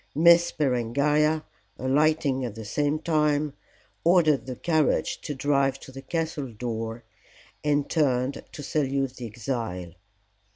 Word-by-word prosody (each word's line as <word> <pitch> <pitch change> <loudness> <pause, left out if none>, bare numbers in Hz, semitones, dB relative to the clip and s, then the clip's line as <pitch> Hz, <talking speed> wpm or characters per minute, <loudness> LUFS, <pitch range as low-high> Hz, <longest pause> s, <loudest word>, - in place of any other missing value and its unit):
Miss 170 +2 +6
Berengaria, 150 +4 +1 0.3
alighting 140 0 +2
at 115 -4 -4
the 110 -1 -7
same 145 +7 0
time, 150 -2 +1 0.5
ordered 165 -6 +4
the 130 - -4
carriage 160 +1 +1
to 145 - -5
drive 135 -1 +1
to - - -11
the 135 +1 -9
castle 160 -4 -3
door, 115 0 -4 0.6
and 145 -1 +1
turned 135 -4 0
to 145 - -7
salute 135 -3 -1
the 120 - -5
exile. 110 -7 -4
140 Hz, 125 wpm, -26 LUFS, 125-155 Hz, 0.6 s, Miss